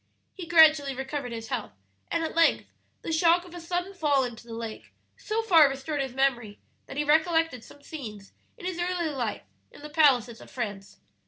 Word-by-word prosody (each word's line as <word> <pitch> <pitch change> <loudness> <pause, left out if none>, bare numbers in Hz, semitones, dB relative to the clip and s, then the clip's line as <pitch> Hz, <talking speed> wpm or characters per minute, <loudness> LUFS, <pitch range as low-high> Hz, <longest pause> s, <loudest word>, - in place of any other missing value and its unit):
"He 360 -4 -8
gradually 310 -4 +5
recovered 265 -1 -4
his 225 -1 -7
health, - - -4 0.4
and 330 - -1
at 320 - -3
length 330 0 +3 0.4
the - - -4
shock 335 +2 +3
of 355 - -14
a 350 - -8
sudden 355 +3 -3
fall 295 -7 +2
into 240 -1 -7
the 230 - -7
lake 225 -1 -8 0.2
so 450 +1 -3
far 330 -9 +6
restored 275 +2 -3
his 265 -2 -5
memory 240 -6 0 0.3
that - - -8
he 295 - +1
recollected 315 -3 +2
some 285 - -16
scenes 215 -11 -9 0.3
in 405 - -10
his 365 -2 -3
early 350 -2 -1
life 250 -7 -3 0.3
in - - -16
the 300 - -8
palaces 250 -7 +3
of - - -13
France. 205 -5 -6
295 Hz, 190 wpm, -27 LUFS, 245-335 Hz, 0.4 s, far